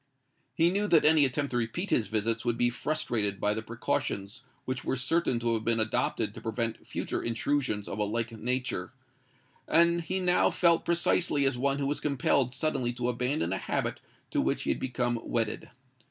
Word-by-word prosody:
He 165 +1 +3
knew 205 +2 0
that 165 -6 +4
any 155 -1 +7
attempt 140 +2 -1
to 120 - 0
repeat 120 - -2
his 110 - +2
visits 110 +2 -1
would 120 -1 0
be 120 0 +3
frustrated 120 -8 -1
by 105 0 +1
the 110 - -3
precautions 110 -2 -3 0.2
which 130 0 -3
were - - -1
certain 130 0 +1
to 115 0 0
have 110 -1 -1
been 115 0 +2
adopted 110 0 0
to - - -9
prevent 115 0 -3
future - - -3
intrusions 115 -2 -1
of - - -5
a - - +2
like 115 +3 -2
nature; 120 -3 -2 0.7
and 170 +1 +4
he 185 +3 -2
now 180 -1 +3
felt 170 -2 +3
precisely 170 -3 +2
as 135 -2 +2
one 135 +2 0
who 140 0 -1
is 150 - -1
compelled 135 -3 +1
suddenly 135 -4 -1
to 120 0 -2
abandon 125 - -1
a 95 - -2
habit - - -2 0.3
to - - +1
which - - 0
he - - 0
had - - -2
become 120 -2 -1
wedded. 115 -3 -2
125 Hz, 190 wpm, -29 LUFS, 115-145 Hz, 0.7 s, any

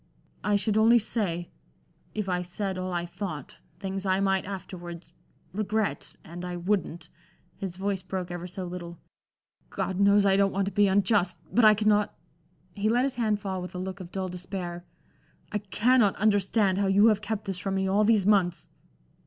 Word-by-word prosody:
I 210 - +2
should 205 +1 +1
only 225 +2 +6
say, 190 -6 -2 0.6
if 210 -2 -2
I 180 -1 0
said 190 +2 -4
all 185 0 -3
I 175 -1 -1
thought, 170 -5 -6 0.2
things 195 0 -4
I 190 -1 +1
might 195 -1 +1
afterwards 175 -3 -8 0.4
regret; 215 +1 -2
and 175 +2 -8
I 180 0 -4
wouldn't" 175 -3 -2 0.5
his 190 -3 -5
voice 195 0 -1
broke 185 -1 -4
ever 175 0 -5
so 185 +1 -6
little 175 -1 -7 0.7
"God 190 0 -3
knows 200 0 +5
I 195 -1 +4
don't 195 0 +3
want 195 0 0
to 200 - -3
be 205 0 +4
unjust! 195 -1 +2 0.2
But 235 -1 +5
I 215 0 +8
cannot" 210 0 +2 0.6
he 210 +1 0
let 240 +3 +3
his 275 - -1
hand 215 -3 0
fall 190 -2 -3
with 180 +1 -8
a - - -3
look 190 +1 -5
of 180 -2 -9
dull 190 -1 -3
despair 180 -1 -5 0.7
"I 210 - 0
cannot 210 +2 +3
understand 200 -1 +2
how 200 - +2
you 200 +2 +5
have 210 -1 +1
kept 210 0 -3
this 190 -3 -3
from 195 +1 -2
me 190 0 0
all 200 +2 +3
these 210 -3 +3
months!" 180 -5 +2
195 Hz, 185 wpm, -27 LUFS, 180-210 Hz, 0.7 s, I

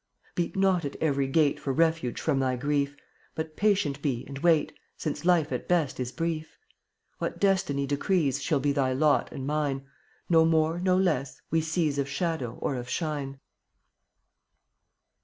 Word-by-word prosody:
Beat 175 -1 -2
not 190 -3 +2
at 140 - -4
every 140 -3 +1
gate 145 +1 +2
For 135 - -2
refuge 160 -4 +1
from 135 - +1
thy 130 -1 +1
grief, 140 +2 0 0.4
But 160 -1 -4
patient 190 -9 +1
be 130 -5 -1
and 135 -1 -7
wait, 160 -2 +3 0.2
Since 150 +1 -4
life 170 -4 +3
at - - -3
best 165 -8 +1
is 125 -1 -2
brief. 165 -1 -3 0.6
What - - -3
Destiny 185 -8 +2
decrees 145 0 +1
Shall 155 -5 +1
be 145 +1 +1
thy 135 -2 +1
lot 145 +2 +2
and 135 - -5
mine 140 -2 -1 0.2
— - - -35
No 165 -2 +5
more, 160 +1 +2
no 185 0 +2
less, 155 -8 0
we 165 +1 +3
seize 155 -2 0
Of 140 0 -1
shadow 140 -5 -2
or 135 - -1
of 125 0 -6
shine. 140 -2 -3
150 Hz, 165 wpm, -28 LUFS, 140-165 Hz, 0.6 s, No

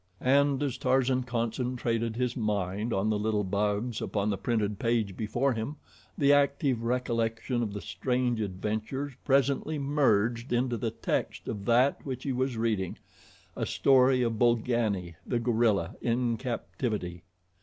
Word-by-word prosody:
And 140 +1 +3
as 130 -3 -2
Tarzan 130 -1 +2
concentrated 115 -1 -1
his 125 0 -1
mind 105 -1 -1
on 105 +2 +1
the 105 - 0
little 105 -1 0
bugs 105 +4 -1
upon 105 0 -1
the 100 - -1
printed 105 -4 -1
page 115 -5 0
before 120 +6 0
him, 115 +6 -4 0.4
the 140 -1 +5
active 140 -3 +2
recollection 120 0 -1
of 110 -3 -2
the 100 - -5
strange 125 +4 -1
adventures 110 +8 -3
presently 140 +3 +2
merged 120 -5 +1
into 120 0 +1
the 115 0 -1
text 110 - -3
of 100 -2 -4
that 125 +5 +3
which 130 -2 -5
he 140 - -1
was 130 -1 -1
reading 110 -5 -1 0.6
a - - -2
story 130 -1 +4
of 115 -2 -1
Bolgani, 110 -7 +1
the 120 - -1
gorilla, 115 -7 +1
in 120 0 +1
captivity. 110 -6 -3
120 Hz, 145 wpm, -29 LUFS, 110-130 Hz, 0.6 s, the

